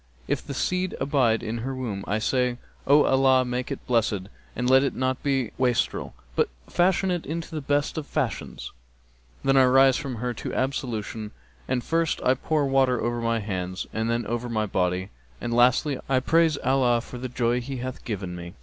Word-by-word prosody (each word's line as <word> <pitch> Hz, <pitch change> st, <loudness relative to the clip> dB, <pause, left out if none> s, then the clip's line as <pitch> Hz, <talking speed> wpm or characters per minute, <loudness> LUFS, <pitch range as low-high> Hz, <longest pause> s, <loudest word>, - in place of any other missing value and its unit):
If -, -, -1 dB
the 140 Hz, -, -6 dB
seed 180 Hz, +5 st, -1 dB
abide 130 Hz, -5 st, +2 dB
in 115 Hz, +1 st, -3 dB
her 130 Hz, +3 st, -3 dB
womb 110 Hz, -7 st, -4 dB
I 105 Hz, -, +1 dB
say, 125 Hz, +2 st, 0 dB, 0.3 s
'O 145 Hz, +2 st, +6 dB
Allah 130 Hz, -1 st, +4 dB
make 125 Hz, +1 st, -3 dB
it 135 Hz, -, -5 dB
blessed 115 Hz, -5 st, +1 dB, 0.3 s
and 125 Hz, -, -1 dB
let 130 Hz, +1 st, +6 dB
it 135 Hz, -, -1 dB
not 130 Hz, 0 st, -1 dB
be 135 Hz, -2 st, +1 dB
a 115 Hz, -, -8 dB
wastrel, 125 Hz, -2 st, 0 dB, 0.2 s
but -, -, +2 dB, 0.2 s
fashion 185 Hz, +1 st, +2 dB
it 175 Hz, -2 st, -1 dB
into 165 Hz, +2 st, -4 dB
the 155 Hz, -, -3 dB
best 145 Hz, +2 st, 0 dB
of 145 Hz, -, -8 dB
fashions!'[FN#272] 135 Hz, -8 st, -3 dB, 0.7 s
Then 135 Hz, 0 st, +3 dB
I 130 Hz, -, +7 dB
rise 135 Hz, +1 st, +5 dB
from 140 Hz, -4 st, -4 dB
her 125 Hz, +2 st, -2 dB
to -, -, -5 dB
ablution 115 Hz, -5 st, -3 dB, 0.3 s
and 125 Hz, -, -1 dB
first 165 Hz, +1 st, 0 dB
I 130 Hz, -, +4 dB
pour 150 Hz, +3 st, 0 dB
water 135 Hz, -2 st, +3 dB
over 120 Hz, 0 st, -1 dB
my 115 Hz, -1 st, 0 dB
hands 95 Hz, -2 st, -3 dB
and 110 Hz, +1 st, -1 dB
then 115 Hz, 0 st, 0 dB
over 120 Hz, +2 st, -3 dB
my 110 Hz, -2 st, 0 dB
body 90 Hz, -1 st, -1 dB, 0.3 s
and 120 Hz, -, -3 dB
lastly, 125 Hz, +3 st, +3 dB
I 130 Hz, -1 st, +4 dB
praise 160 Hz, +3 st, +3 dB
Allah 125 Hz, -2 st, +3 dB
for 125 Hz, 0 st, -9 dB
the 130 Hz, +1 st, -4 dB
joy 120 Hz, 0 st, 0 dB
He 135 Hz, +2 st, -5 dB
hath 130 Hz, +1 st, -6 dB
given 95 Hz, -6 st, -4 dB
me.' 85 Hz, +2 st, -8 dB
125 Hz, 195 wpm, -25 LUFS, 115-135 Hz, 0.7 s, I